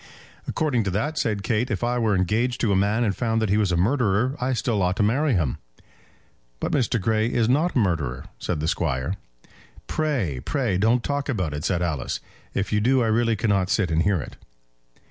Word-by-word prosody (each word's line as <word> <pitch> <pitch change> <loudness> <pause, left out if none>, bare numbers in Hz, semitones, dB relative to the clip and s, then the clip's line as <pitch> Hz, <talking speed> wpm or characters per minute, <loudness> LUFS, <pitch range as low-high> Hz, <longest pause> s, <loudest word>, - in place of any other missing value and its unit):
"According 145 -8 0
to - - 0
that," 145 - -1
said 105 -3 -1
Kate, 115 +3 0
"if 105 -1 -2
I 120 +1 +1
were 110 -3 +2
engaged 110 +7 0
to 115 - +2
a - - +3
man, 105 +5 +2
and 100 -4 0
found 115 -2 0
that 110 -2 0
he 105 - +3
was 105 -4 +2
a 85 - +1
murderer, 115 +4 +1
I 130 +1 +1
still 115 -4 0
ought 90 0 +1
to - - +1
marry 135 +7 +2
him." 80 -9 0 1.0
"But - - -2
Mr. 125 -3 +1
Grey 110 +2 +1
is 115 -2 +2
not 150 +8 +2
a - - +3
murderer," 80 - 0
said 80 -4 -2
the 80 - -1
Squire. 75 -2 -1 0.7
"Pray, 125 - -1
pray, 120 -10 0
don't 115 +4 +3
talk 145 0 -2
about 90 - -1
it," 75 0 -4
said 90 -2 0
Alice. 80 -7 -2 0.4
"If 100 +2 -1
you 105 - +2
do 125 +2 +3
I - - +1
really 115 +1 +2
cannot 100 -4 +1
sit 95 -6 +1
and 80 +1 +2
hear 95 0 +2
it." - - -8
110 Hz, 210 wpm, -24 LUFS, 90-120 Hz, 1.0 s, a